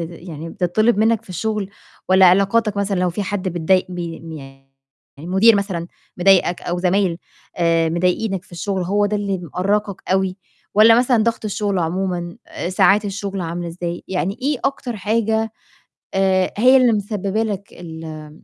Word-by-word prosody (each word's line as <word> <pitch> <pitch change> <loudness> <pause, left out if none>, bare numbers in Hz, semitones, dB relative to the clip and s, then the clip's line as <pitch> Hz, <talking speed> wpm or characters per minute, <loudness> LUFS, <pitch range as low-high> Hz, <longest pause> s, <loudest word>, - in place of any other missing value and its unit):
يعني 165 -1 -7
بتتطلب 210 +6 +1
مِنّك 225 0 +2
في - - -23
الشغل، 205 +2 -2 0.4
والّا 185 0 +6
علاقاتك 200 +3 +3
مثلًا 200 -2 0
لو 180 -1 +1
في 205 - -3
حد 195 -1 -3
بتضايق 180 +2 +1
ب 180 - -6
يعني 150 -5 -8 0.5
المُدير 190 +7 +4
مثلًا 190 -4 -3 0.3
مضايقك 180 -1 +3
أو 175 0 -2
زمايل 180 -1 +1 0.4
آآ 165 -1 +2
مضايقينك 180 +3 0
في - - -23
الشغل، 185 +2 -2
هو 205 +3 +1
ده 210 - -1
اللي 200 -2 -2
مأرقك 195 +4 -2
أوي، 190 0 +1 0.4
والّا 225 +2 +7
مثلًا 245 -2 +3
ضغط 230 -1 -1
الشغل 205 -2 -1
عمومًا؟ 175 0 -2 0.3
ساعات 200 +3 +3
الشغل 195 -1 -4
عاملة 170 0 -4
إزاي؟ 175 0 -5
يعني 190 +2 -2
إيه 285 -1 0
أكتر 275 -4 -2
حاجة 220 +1 0 0.6
آآ 190 -1 +2
هي 255 +4 +6
اللي 250 -2 +4
مسببة 205 +1 -1
لك 200 -2 -5
ال 165 -2 -9
آمم 155 0 -10
190 Hz, 155 wpm, -20 LUFS, 175-210 Hz, 0.6 s, والّا